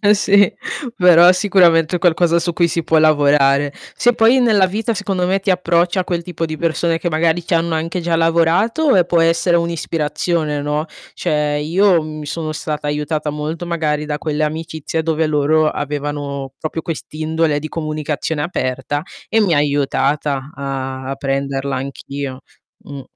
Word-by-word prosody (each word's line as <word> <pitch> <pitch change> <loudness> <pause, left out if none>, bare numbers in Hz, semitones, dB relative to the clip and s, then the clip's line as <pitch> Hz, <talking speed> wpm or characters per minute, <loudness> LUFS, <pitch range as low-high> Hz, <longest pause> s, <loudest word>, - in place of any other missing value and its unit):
sì, 200 -1 +3 0.4
però 180 0 +7
sicuramente 180 -4 +3
è - - -1
qualcosa 170 0 +3
su 170 0 -2
cui 170 0 +2
si 165 0 -2
può 160 - +2
lavorare. 145 -2 +3 0.2
Se 245 0 +3
poi 230 +4 +4
nella 210 -6 +4
vita, 225 +4 -2
secondo 195 -3 -2
me 195 +1 +1
ti 195 - -3
approcci 175 0 +1
a 185 - +2
quel 170 -2 -3
tipo 165 -2 -4
di 155 -1 -5
persone 165 0 0
che 175 - -2
magari 165 +2 0
ci - - -2
hanno 165 0 +1
anche 165 +3 -2
già 170 0 0
lavorato, 170 - +2
eh, 180 -2 +4
può 170 -1 +1
essere 165 +1 +2
un'ispirazione, 160 -2 -2
no, 150 +2 -2 0.3
cioè 150 -1 -1
io 175 +3 +3
mi 155 -1 -7
sono 155 +1 -4
stata 150 -1 -4
aiutata 150 +1 -2
molto 155 +3 -4
magari 155 -3 -1
da 150 -1 -3
quelle 155 0 -2
amicizie 160 +1 -3
dove 160 0 0
loro 155 +1 +2
avevano 145 -2 -4
proprio 160 +1 -4
quest'indole 155 -1 -2
di 155 - -6
comunicazione 155 -1 -3
aperta 135 -2 -2 0.3
e 225 0 +2
mi 185 -5 +2
ha - - +3
aiutata 140 0 0
a 135 -1 -4 0.3
a 135 - -3
prenderla 135 0 -2
anch'io. 135 0 -6 0.4
Mh. 140 -1 -8
160 Hz, 165 wpm, -18 LUFS, 150-170 Hz, 0.4 s, però